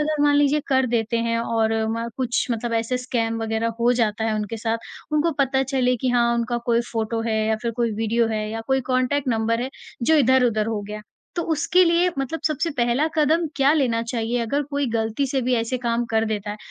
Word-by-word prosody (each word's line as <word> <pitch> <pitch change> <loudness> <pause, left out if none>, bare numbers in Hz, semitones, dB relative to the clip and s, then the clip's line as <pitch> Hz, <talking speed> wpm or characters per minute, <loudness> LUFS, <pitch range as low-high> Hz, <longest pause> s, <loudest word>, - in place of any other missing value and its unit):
अगर 300 -1 0
मान 290 0 +4
लीजिए 290 +1 +3
कर 265 -2 +3
देते 230 -1 0
हैं 230 0 +1
और 225 -1 0 0.2
म 230 +1 -3
कुछ 250 -2 0
मतलब 235 0 -2
ऐसे 230 +2 0
स्कैम 235 -3 -1
वगैरह 225 +1 -1
हो 240 +1 +4
जाता 225 -2 0
है 220 - 0
उनके 215 +1 -3
साथ, 225 +1 -1 0.3
उनको 305 +2 +2
पता 265 -1 +2
चले 260 -2 +1
कि 260 - 0
हाँ, 235 -1 +3
उनका 235 0 -1
कोई 235 -1 +3
फ़ोटो 225 0 -1
है 225 -1 -1
या 220 0 +1
फिर 235 - -1
कोई 235 -2 +1
वीडियो 225 +2 +1
है 220 -1 -1
या 225 +1 -4
कोई 265 0 +2
कॉन्टैक्ट 255 +2 0
नंबर 230 0 +1
है, 260 - -3 0.3
जो 320 +7 +4
इधर-उधर 245 -5 +3
हो 225 -2 -2
गया, 210 0 -6 0.4
तो 340 - 0
उसके 335 +4 +3
लिए 345 +1 +3
मतलब 275 +4 -3
सबसे 315 +2 -1
पहला 240 +4 +2
कदम 320 +2 +2
क्या 275 +1 +4
लेना 250 -7 +1
चाहिए 230 0 -2
अगर 280 +6 0
कोई 285 -1 0
गलती 225 +4 -1
से 265 0 -1
भी 250 +1 +1
ऐसे 230 +2 -1
काम 235 -1 0
कर 225 0 +2
देता 210 -2 -3
है? 210 - -5
240 Hz, 220 wpm, -23 LUFS, 225-270 Hz, 0.4 s, मान